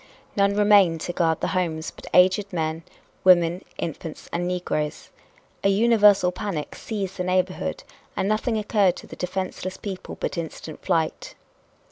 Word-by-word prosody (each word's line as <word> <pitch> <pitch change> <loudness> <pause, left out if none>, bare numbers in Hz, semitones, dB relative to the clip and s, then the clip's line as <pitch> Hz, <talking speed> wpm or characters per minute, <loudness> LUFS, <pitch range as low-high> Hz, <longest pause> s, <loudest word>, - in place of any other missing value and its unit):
None 200 0 +3
remained 205 -5 +5
to 175 - -3
guard 165 -2 +1
the - - 0
homes 165 -4 -1
but - - -13
aged 185 +2 +4
men, 160 -2 -2 0.4
women, 175 -1 +5
infants 160 0 -6
and 175 +1 -1
negroes. 175 -4 -3 0.5
A 195 - +4
universal 205 -3 +5
panic 180 -5 -4
seized 195 -4 -5
the 180 - -1
neighborhood 185 - -1 0.3
and 190 - 0
nothing 220 +2 0
occurred 205 -4 +2
to - - -10
the - - -10
defenseless 185 0 -4
people 195 -3 -7
but - - -2
instant 160 -1 -7
flight. 165 -4 -1
185 Hz, 145 wpm, -24 LUFS, 170-200 Hz, 0.5 s, remained